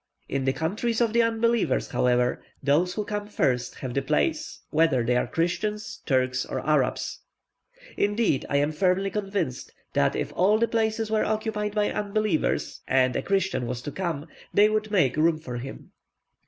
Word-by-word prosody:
In 135 -1 -2
the 135 - +3
countries 215 - -1
of 230 -2 +2
the 235 - +5
unbelievers, 230 - +1
however, 125 0 +1 0.2
those 165 +6 +2
who 210 - -2
come 205 0 -3
first 125 -11 0
have 130 -2 -5
the 140 - +1
place, 310 - -1
whether 155 -7 +3
they 125 +1 +1
are 125 - +1
Christians, 210 +6 -2
Turks, 130 -2 +1
or - - -4
Arabs; 150 -4 +1 0.8
indeed, 205 - +1
I 140 - +2
am 145 +2 +2
firmly 185 +4 +1
convinced, 195 -10 -3 0.2
that - - +2
if - - -3
all 200 +4 +4
the 230 +1 +2
places 220 -1 0
were 220 - +2
occupied 215 -1 -2
by 210 -1 +2
unbelievers, 210 -4 -1
and 130 -1 +3
a - - 0
Christian 190 -10 0
was 125 0 -4
to 145 - -4
come, 165 -5 -3 0.3
they 210 +1 +5
would 215 0 -1
make 175 - +2
room 160 +1 +3
for 125 -6 -6
him. 135 +3 -8
185 Hz, 170 wpm, -26 LUFS, 135-215 Hz, 0.8 s, the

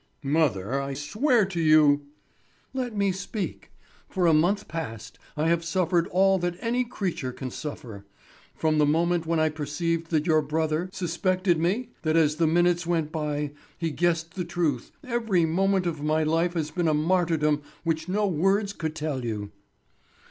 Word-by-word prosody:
"Mother, 135 -5 +1
I 135 0 -4
swear 220 - +2
to 180 -3 -3
you—" 150 -2 +5 0.7
"Let 250 -5 -3
me 200 -1 +2
speak. 195 +2 -5 0.4
For 185 -3 0
a 165 - +5
month 185 +7 +2
past 150 -10 -6 0.2
I 155 +2 +1
have 170 0 +2
suffered 175 0 +1
all 190 +1 +3
that 175 0 -2
any 245 +1 0
creature 185 - -3
can 130 0 -6
suffer. 115 -10 -7 0.5
From 155 -1 +1
the 150 - +4
moment 170 +2 +1
when 165 -1 +1
I 155 0 +3
perceived 160 +2 -2
that 155 -2 +1
your 155 -2 +4
brother, 155 +1 0
my - - -2
other 185 - -11
son, - - -12
suspected 180 0 +1
me, 195 +10 0
that 155 0 +1
as 155 -2 +3
the 165 -1 +3
minutes 175 +1 +2
went 165 -3 0
by, 150 -2 -2 0.3
he 165 -2 -2
guessed 165 +1 0
the 185 - -3
truth, 170 -7 -2
every 225 -9 +1
moment 190 +3 +1
of 160 -4 -2
my 155 +1 +1
life 165 +3 +1
has 155 -2 -2
been 175 -3 0
a 155 - +3
martyrdom 155 -2 +2 0.2
which 165 +1 -1
no 205 +3 +1
words 195 +3 +1
could 160 -4 -4
tell 150 -4 -3
you." 105 -3 -4
165 Hz, 175 wpm, -26 LUFS, 150-185 Hz, 0.7 s, you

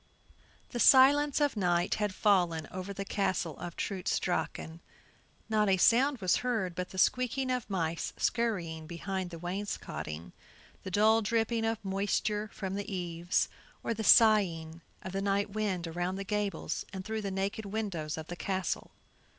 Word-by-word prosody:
The 240 - -3
silence 280 +4 +6
of 290 -3 +2
night 175 -4 +1
had 210 -1 +1
fallen 175 -6 +2
over 185 +1 -5
the 195 0 -5
Castle 190 -6 -1
of 175 - -6
Trutz 190 -3 -1
Drachen; 165 -1 -3 0.7
not 215 -2 +2
a 190 - +4
sound 255 +8 +4
was 185 -1 +3
heard 225 -8 -1
but 180 +1 -4
the 190 - -10
squeaking 255 +5 +2
of 250 -3 -2
mice 170 -4 -1
scurring 170 -9 -1
behind 185 +2 -4
the 170 - -8
wainscoting, 170 - -5 0.5
the - - -6
dull 215 +4 +4
dripping 225 +1 0
of 225 -2 -2
moisture 205 +2 -1
from 190 -2 -5
the 205 +2 -4
eaves, 175 -2 0 0.4
or - - 0
the 220 0 -4
sighing 175 -8 +4 0.2
of 185 - -5
the 195 +1 -2
night 200 0 0
wind 200 -4 -1
around 175 +3 -2
the 195 - -4
gables 205 -3 -2
and 190 -1 -6
through 220 0 -3
the 200 - -3
naked 195 +2 -3
windows 195 -8 -3
of 160 - -5
the 175 - -6
castle. 190 -1 -3
195 Hz, 160 wpm, -31 LUFS, 175-215 Hz, 0.7 s, silence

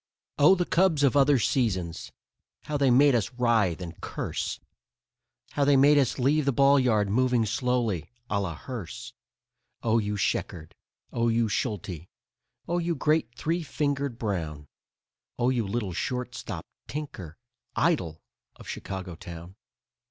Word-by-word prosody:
Oh, 150 +7 +7
the 175 -1 0
Cubs 170 -5 +2
of 140 -2 +4
other 140 0 +5
seasons, 95 - -1 0.5
how 150 - -4
they 140 -2 +3
made 140 +3 +6
us 120 0 0
writhe 110 -8 +2
and 85 -1 -9
curse! - - -4 0.9
How 145 - 0
they 140 0 +5
made 145 +2 +6
us 135 - +1
leave 140 +3 +2
the 140 - +3
ball 140 +2 +5
yard 110 -5 +2
moving 125 +2 +2
slowly, 115 -5 -1 0.2
a 100 -3 0
la 85 -4 -3
hearse. 115 - -7 0.7
Oh 115 0 +3
you 105 -1 -2
Sheckard, 80 -4 -2 0.4
oh 115 0 +1
you 115 0 +2
Schulte, 95 - -3 0.6
oh 175 +1 0
you 170 0 -1
great 150 -5 +1
Three 165 +7 -1
Fingered 140 -4 -2
Brown, 80 -10 -3 0.7
Oh 125 +1 +2
you 120 -5 0
little 100 -3 -2
shortstop 125 +7 -4 0.2
Tinker, 130 - -7 0.4
idol 90 - 0 0.3
of - - -14
Chicago 95 -2 -5
town! 85 +2 -10
120 Hz, 140 wpm, -27 LUFS, 95-140 Hz, 0.9 s, Oh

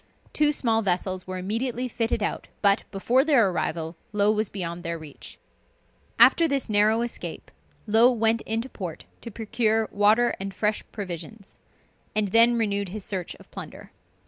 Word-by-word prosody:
Two 300 -1 +3
small 230 -6 +1
vessels 185 -1 -2
were 185 0 -4
immediately 235 +6 -2
fitted 230 -2 -1
out, - - -3 0.2
but, 200 0 +4
before 235 +7 +2
their 255 -11 +3
arrival, 165 -1 -3 0.2
Low 210 0 +3
was 215 -1 0
beyond 175 -3 -4
their 170 0 -4
reach. 155 -3 -11 0.8
After 335 - +6
this 280 -3 -1
narrow 215 +2 +3
escape, 240 - -7 0.3
Low 225 +3 +5
went 225 -1 +2
into 225 +3 -1
port 180 -10 -7 0.2
to 235 - -8
procure 220 0 0
water 215 +4 +3
and 195 0 -6
fresh 210 0 0
provisions; 190 0 -8 0.6
and 210 -2 +1
then 230 +3 +6
renewed 200 -3 -1
his 205 +1 -7
search 185 -4 -4
of - - -19
plunder. - - -10
215 Hz, 155 wpm, -25 LUFS, 190-230 Hz, 0.8 s, After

